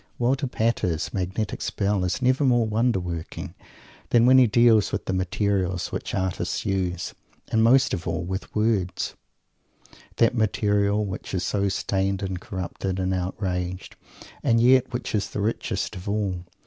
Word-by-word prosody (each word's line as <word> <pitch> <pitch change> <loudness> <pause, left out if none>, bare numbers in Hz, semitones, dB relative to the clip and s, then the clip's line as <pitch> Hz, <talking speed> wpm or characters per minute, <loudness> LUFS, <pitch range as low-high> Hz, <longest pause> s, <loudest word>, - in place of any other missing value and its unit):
Walter 135 +3 +1
Pater's 110 -9 -1
magnetic 95 +3 -2
spell 100 -2 0
is 90 +8 -1
never 130 +3 +3
more 120 -3 +3
wonder 110 0 +1
working 85 -2 -6 0.6
than 120 -1 +5
when 130 +1 +7
he 125 - +6
deals 115 -1 +4
with - - -3
the 95 - -1
materials 95 -1 -1
which - - -4
artists 95 -1 -2
use. 90 -3 -1 0.4
And 110 0 +3
most 125 +3 +5
of 85 -3 -3
all, 85 +1 -1
with 95 +2 -5
words, 105 -5 0 1.0
that 115 - +3
material 105 -2 +1
which 95 0 -5
is 90 - -1
so 100 +1 0
stained 95 0 -1
and 95 -2 -3
corrupted 95 0 -4
and 95 0 0
outraged 90 0 -3 0.5
and 115 0 +3
yet 130 +2 +4
which 120 0 -4
is 105 -1 0
the - - -5
richest 110 +3 -2
of 95 +3 -6
all. 100 -4 -2
100 Hz, 155 wpm, -25 LUFS, 95-115 Hz, 1.0 s, when